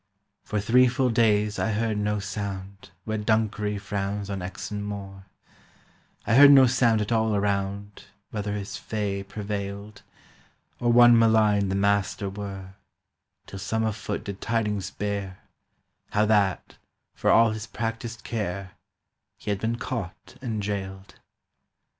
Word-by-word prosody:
For 105 Hz, -, -3 dB
three 125 Hz, +5 st, +5 dB
full 125 Hz, 0 st, +1 dB
days 105 Hz, -2 st, +2 dB
I 110 Hz, -, 0 dB
heard 110 Hz, +1 st, 0 dB
no 105 Hz, 0 st, 0 dB
sound 100 Hz, 0 st, -6 dB, 0.2 s
Where 110 Hz, -1 st, -2 dB
Dunkery 105 Hz, -1 st, 0 dB
frowns 100 Hz, 0 st, -3 dB
on 100 Hz, -, -3 dB
Exon 100 Hz, +3 st, -5 dB
Moor, 100 Hz, -1 st, -7 dB, 1.0 s
I -, -, +1 dB
heard 140 Hz, +3 st, +9 dB
no 135 Hz, -2 st, +8 dB
sound 120 Hz, -3 st, +3 dB
at 105 Hz, -, -3 dB
all 110 Hz, -2 st, +2 dB
around 100 Hz, 0 st, -2 dB, 0.3 s
Whether 105 Hz, -1 st, -3 dB
his 100 Hz, -1 st, -5 dB
fay 100 Hz, -2 st, -3 dB
prevailed, 100 Hz, 0 st, -6 dB, 0.8 s
Or 120 Hz, 0 st, +2 dB
one 120 Hz, -1 st, +7 dB
malign 110 Hz, -3 st, +3 dB
the 95 Hz, -, -1 dB
master 100 Hz, 0 st, 0 dB
were, 95 Hz, -2 st, -7 dB, 0.7 s
Till 100 Hz, -, -9 dB
some 110 Hz, +3 st, -1 dB
afoot 110 Hz, -1 st, -3 dB
did 100 Hz, -1 st, -7 dB
tidings 105 Hz, -4 st, -1 dB
bear 100 Hz, -2 st, -4 dB, 0.7 s
How 105 Hz, +1 st, +2 dB
that, 105 Hz, -3 st, +1 dB, 0.4 s
for -, -, -1 dB
all 115 Hz, -1 st, +6 dB
his 110 Hz, 0 st, -5 dB
practised 115 Hz, +1 st, -5 dB
care, 100 Hz, -4 st, -4 dB, 0.7 s
He 105 Hz, -, -4 dB
had 100 Hz, -, -1 dB
been 115 Hz, +1 st, 0 dB
caught 110 Hz, -8 st, -6 dB
and 110 Hz, -5 st, -3 dB
jailed. 95 Hz, -1 st, -5 dB
105 Hz, 135 wpm, -26 LUFS, 100-110 Hz, 1.0 s, heard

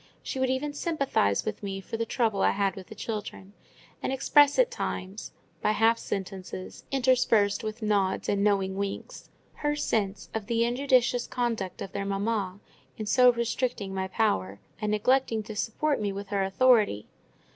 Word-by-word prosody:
She 265 Hz, -, -4 dB
would 260 Hz, 0 st, +1 dB
even 275 Hz, +3 st, -1 dB
sympathise 275 Hz, -, 0 dB
with 215 Hz, -1 st, -4 dB
me 195 Hz, -1 st, -4 dB
for 195 Hz, -, -6 dB
the 230 Hz, 0 st, -2 dB
trouble 220 Hz, -5 st, 0 dB
I -, -, +5 dB
had 195 Hz, -2 st, 0 dB
with 190 Hz, -1 st, -9 dB
the 220 Hz, -, -10 dB
children, 205 Hz, -2 st, -6 dB, 0.5 s
and -, -, -2 dB
express 285 Hz, +2 st, +4 dB
at -, -, +4 dB
times, 195 Hz, -, -4 dB, 0.3 s
by 210 Hz, -, +2 dB
half 225 Hz, +2 st, +3 dB
sentences, 190 Hz, -1 st, -6 dB
interspersed 245 Hz, -6 st, +3 dB
with 215 Hz, +1 st, -5 dB
nods 200 Hz, -3 st, +1 dB
and 200 Hz, 0 st, +1 dB
knowing 195 Hz, -2 st, +2 dB
winks, 200 Hz, -, -5 dB, 0.3 s
her 295 Hz, 0 st, 0 dB
sense 210 Hz, -9 st, -1 dB
of 220 Hz, -2 st, -4 dB
the 230 Hz, 0 st, +2 dB
injudicious 245 Hz, -1 st, +2 dB
conduct 230 Hz, -7 st, -2 dB
of 195 Hz, -, -8 dB
their 200 Hz, -, -3 dB
mamma 200 Hz, -1 st, -1 dB, 0.4 s
in 215 Hz, -, -4 dB
so 250 Hz, +4 st, +6 dB
restricting 235 Hz, -3 st, -2 dB
my 190 Hz, 0 st, -2 dB
power, 100 Hz, -, 0 dB, 0.2 s
and 210 Hz, -, 0 dB
neglecting 225 Hz, +1 st, +2 dB
to 215 Hz, 0 st, -8 dB
support 275 Hz, +7 st, 0 dB
me 205 Hz, -1 st, 0 dB
with 200 Hz, 0 st, -6 dB
her 200 Hz, -1 st, 0 dB
authority. 205 Hz, -, +3 dB
215 Hz, 170 wpm, -28 LUFS, 195-245 Hz, 0.5 s, so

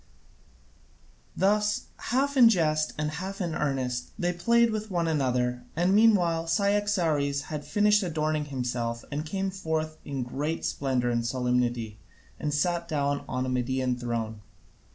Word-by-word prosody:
Thus 210 Hz, +2 st, +1 dB, 0.2 s
half 275 Hz, +3 st, +1 dB
in 245 Hz, -4 st, +8 dB
jest 155 Hz, -6 st, +1 dB
and 150 Hz, -1 st, -1 dB
half 190 Hz, +5 st, -5 dB
in 175 Hz, -4 st, -2 dB
earnest 130 Hz, -5 st, -2 dB
they 175 Hz, 0 st, 0 dB
played 235 Hz, +6 st, +3 dB
with 215 Hz, 0 st, -3 dB
one 170 Hz, -3 st, 0 dB
another, 125 Hz, -5 st, 0 dB
and 175 Hz, +4 st, +2 dB
meanwhile 180 Hz, -7 st, +4 dB
Cyaxares 170 Hz, -7 st, +1 dB
had 150 Hz, -1 st, -4 dB
finished 210 Hz, 0 st, +3 dB
adorning 155 Hz, -4 st, -1 dB
himself 120 Hz, -4 st, -3 dB
and 150 Hz, +2 st, -3 dB
came 195 Hz, +3 st, -2 dB
forth 160 Hz, -4 st, -3 dB
in 135 Hz, -3 st, -3 dB
great 145 Hz, +6 st, -3 dB
splendour 130 Hz, -3 st, 0 dB
and 120 Hz, 0 st, 0 dB
solemnity, 120 Hz, -3 st, -1 dB, 0.4 s
and 150 Hz, -, -2 dB
sat 170 Hz, +3 st, 0 dB
down 145 Hz, -2 st, -1 dB
on 130 Hz, 0 st, -1 dB
a -, -, -2 dB
Median 130 Hz, 0 st, 0 dB
throne. 115 Hz, -3 st, -3 dB
155 Hz, 140 wpm, -27 LUFS, 125-185 Hz, 0.4 s, in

